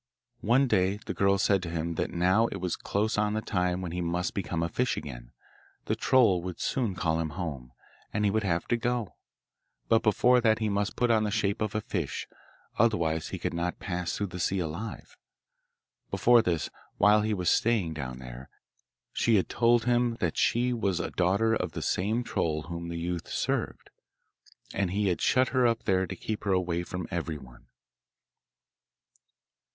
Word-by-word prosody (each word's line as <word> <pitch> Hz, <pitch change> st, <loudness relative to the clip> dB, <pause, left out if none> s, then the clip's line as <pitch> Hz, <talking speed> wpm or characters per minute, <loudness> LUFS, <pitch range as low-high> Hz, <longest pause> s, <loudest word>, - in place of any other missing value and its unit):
One 130 Hz, +5 st, +3 dB
day 95 Hz, -3 st, +2 dB
the -, -, -3 dB
girl 100 Hz, 0 st, +3 dB
said 100 Hz, -1 st, +2 dB
to 90 Hz, -, -5 dB
him 85 Hz, 0 st, -2 dB
that -, -, -2 dB
now 95 Hz, +6 st, +3 dB
it -, -, -6 dB
was 90 Hz, -2 st, -2 dB
close 105 Hz, +1 st, -1 dB
on 105 Hz, 0 st, +1 dB
the -, -, +1 dB
time 90 Hz, -1 st, 0 dB
when 90 Hz, -3 st, -4 dB
he 90 Hz, +1 st, -3 dB
must 85 Hz, +1 st, -1 dB
become 85 Hz, -4 st, -2 dB
a -, -, +1 dB
fish 125 Hz, +10 st, -1 dB
again -, -, -8 dB, 0.5 s
the -, -, 0 dB
troll 115 Hz, -9 st, +4 dB
would 90 Hz, 0 st, -6 dB
soon 115 Hz, -8 st, -1 dB
call 80 Hz, -2 st, 0 dB
him 80 Hz, -1 st, -1 dB
home, 70 Hz, -9 st, -5 dB, 0.4 s
and 105 Hz, 0 st, 0 dB
he 100 Hz, -, +3 dB
would 110 Hz, +2 st, +1 dB
have 85 Hz, -4 st, -1 dB
to 120 Hz, -, +2 dB
go, 120 Hz, -3 st, -2 dB, 0.7 s
but 115 Hz, 0 st, +5 dB
before 120 Hz, +3 st, +4 dB
that 110 Hz, -2 st, +3 dB
he 110 Hz, -1 st, -1 dB
must 100 Hz, 0 st, -1 dB
put 120 Hz, -1 st, +2 dB
on 110 Hz, -1 st, +3 dB
the 105 Hz, -, 0 dB
shape 100 Hz, 0 st, 0 dB
of 105 Hz, -2 st, -1 dB
the 110 Hz, -, -1 dB
fish, 90 Hz, -8 st, -3 dB, 0.5 s
otherwise 85 Hz, -8 st, +2 dB
he -, -, -5 dB
could -, -, -3 dB
not 85 Hz, +1 st, -2 dB
pass 90 Hz, -3 st, -3 dB
through 100 Hz, -, -1 dB
the 90 Hz, -2 st, -7 dB
sea 95 Hz, +3 st, 0 dB
alive. 90 Hz, +6 st, -5 dB, 0.9 s
Before 120 Hz, -1 st, +5 dB
this, 85 Hz, -6 st, -1 dB, 0.3 s
while 105 Hz, +1 st, +5 dB
he 110 Hz, 0 st, 0 dB
was 90 Hz, -2 st, +1 dB
staying 110 Hz, -8 st, +2 dB
down 65 Hz, -5 st, -5 dB
there, 65 Hz, +1 st, -10 dB, 0.6 s
she 115 Hz, -, +2 dB
had 95 Hz, -, +2 dB
told 120 Hz, -1 st, +3 dB
him 120 Hz, -1 st, +2 dB
that 85 Hz, -3 st, -1 dB
she 125 Hz, +1 st, +2 dB
was 100 Hz, -7 st, 0 dB
a -, -, -3 dB
daughter 100 Hz, +5 st, +2 dB
of 90 Hz, -6 st, -2 dB
the -, -, -4 dB
same 110 Hz, +6 st, 0 dB
troll 75 Hz, -8 st, -1 dB
whom 85 Hz, 0 st, -6 dB
the 85 Hz, -, -4 dB
youth 85 Hz, 0 st, -3 dB
served, -, -, -2 dB, 0.8 s
and 95 Hz, -2 st, 0 dB
he 100 Hz, +2 st, +1 dB
had 90 Hz, -, -1 dB
shut 130 Hz, 0 st, +3 dB
her 130 Hz, -2 st, +3 dB
up 115 Hz, -1 st, 0 dB
there 95 Hz, -1 st, +1 dB
to -, -, -5 dB
keep 110 Hz, -1 st, -5 dB
her 100 Hz, -, +1 dB
away 90 Hz, -2 st, 0 dB
from 90 Hz, 0 st, -5 dB
everyone. 75 Hz, -7 st, -6 dB
95 Hz, 190 wpm, -28 LUFS, 85-110 Hz, 0.9 s, but